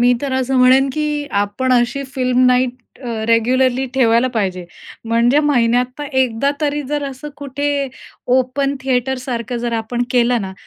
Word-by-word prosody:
मी 245 +1 +5
तर 275 -2 -2
असं 260 0 0
म्हणेन 260 +2 +5
की 300 -1 -2
आपण 205 +6 -1
अशी 245 +3 +1
फिल्म 255 -1 +2
नाईट 250 0 +1 0.2
अ, - - -4 0.2
रेग्युलरली 250 +3 +2
ठेवायला 240 -1 +3
पाहिजे. 185 -5 -2 0.4
म्हणजे 235 +4 +2
महिन्यातनं 250 0 +1
एकदा 255 +2 +1
तरी 295 0 -1
जर 295 0 -1
असं 275 +2 -7
कुठे 285 0 -2 0.5
ओपन 265 +2 0
थिएटरसारखं 250 -2 -2
जर 240 - -2
आपण 230 +2 -2
केलं 245 -1 +2
ना, 190 -2 -5
255 Hz, 145 wpm, -18 LUFS, 240-275 Hz, 0.5 s, मी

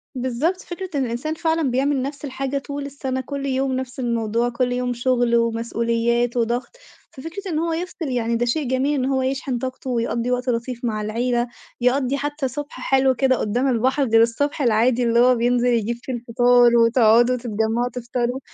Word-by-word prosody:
بالضبط، 260 +9 -1
فكرة 365 +1 -7
إن 270 - +1
الإنسان 245 +7 -3
فعلًا 320 -5 0
بيعمل 270 +1 +1
نَفس 285 +2 -5
الحاجة 275 0 -3
طول 280 0 -5
السَنة، 265 -2 -4
كُلّ 275 +1 -5
يوم 265 0 0
نَفس 260 0 -5
الموضوع، 235 -1 0
كُلّ 245 +1 -1
يوم 250 0 -1
شغل 245 -1 +1
ومسؤوليات 235 +1 0
وضغط، 240 - -1 0.4
ففِكرة 335 +8 -7
إن 310 - 0
هو 330 0 -1
يفصِل 345 -2 -4
يعني 235 -2 0
ده 240 +1 +1
شيء 270 +3 -1
جميل، 260 +3 +1
إن 255 - 0
هو 265 0 +1
يشحن 265 -1 -2
طاقته، 260 +1 -5
ويقضّي 235 0 -1
وقت 250 +1 -1
لطيف 240 +1 -3
مع 215 -2 -1
العيلة، 240 +3 -1 0.3
يقضّي 260 +2 +1
حتى 290 0 -2
صُبح 290 +3 -7
حلو 265 -1 +2
كده 260 0 +2
قدّام 245 +6 0
البحر 260 +3 +1
غير 225 -3 +4
الصبح 285 +6 0
العادي 240 0 +3
اللي 235 0 +3
هو 250 +1 +5
بينزل 245 +1 +1
يجيب 235 -1 +1
فيه 260 - -4
الفطار، 245 0 +4
وتقعدوا 235 +1 +4
تتجمّعوا 230 +1 -1
تفطروا 245 +1 -2
250 Hz, 180 wpm, -22 LUFS, 235-270 Hz, 0.4 s, هو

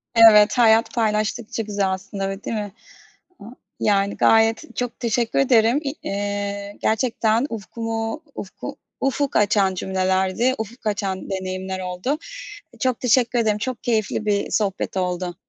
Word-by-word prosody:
Evet, 220 -1 +7
hayat 225 -1 +4
paylaştıkça 220 0 -1
güzel 200 -2 -1
aslında, 195 +1 -4
öyle 195 +1 -6
değil - - -3
mi? 205 -1 -4 0.7
A - - -13 0.4
yani 200 -1 +1
gayet 225 +6 +3
çok 245 -1 -3
teşekkür 235 0 0
ederim. 245 -1 +4
İ 275 -1 -2
eee, 200 0 -3
gerçekten 225 +1 +1
ufkumu 225 - -4
ufku 190 - -7 0.2
ufuk 275 +1 0
açan 200 -2 +3
cümlelerdi. 190 +6 +1
Ufuk 220 +1 -6
açan 200 -3 -2
deneyimler 190 0 -4
oldu. 185 +10 -2 0.6
Eee, - - -19
çok 255 -4 0
teşekkür 245 0 +2
ederim. 215 -2 +2
Çok 255 +3 -4
keyifli 215 -2 0
bir, 210 - +2
eee, - - -4
sohbet 200 -2 -1
oldu. 180 -1 -2
215 Hz, 140 wpm, -22 LUFS, 195-230 Hz, 0.7 s, Evet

